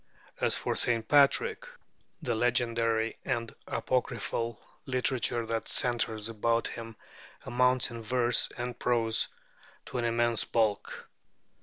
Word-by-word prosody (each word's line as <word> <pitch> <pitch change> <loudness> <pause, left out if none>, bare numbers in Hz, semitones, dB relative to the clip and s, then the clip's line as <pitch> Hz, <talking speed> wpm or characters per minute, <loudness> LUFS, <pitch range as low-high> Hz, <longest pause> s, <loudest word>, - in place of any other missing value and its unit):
As - - +3
for - - -2
St. 115 -2 +2
Patrick, 430 - +3 0.6
the 120 - 0
legendary 115 -1 +1
and 115 -3 -2
apocryphal 115 -2 -2 0.3
literature 125 -2 0
that 115 0 -3
centres 115 -3 0
about 115 +1 0
him 115 -1 -8 0.5
amounts 125 0 +2
in 115 -1 -7
verse 120 +1 +2
and 120 0 -4
prose 115 -2 +1 0.6
to 125 - -4
an 120 - 0
immense 120 0 +2
bulk. 110 -3 -1
120 Hz, 115 wpm, -30 LUFS, 115-125 Hz, 0.6 s, As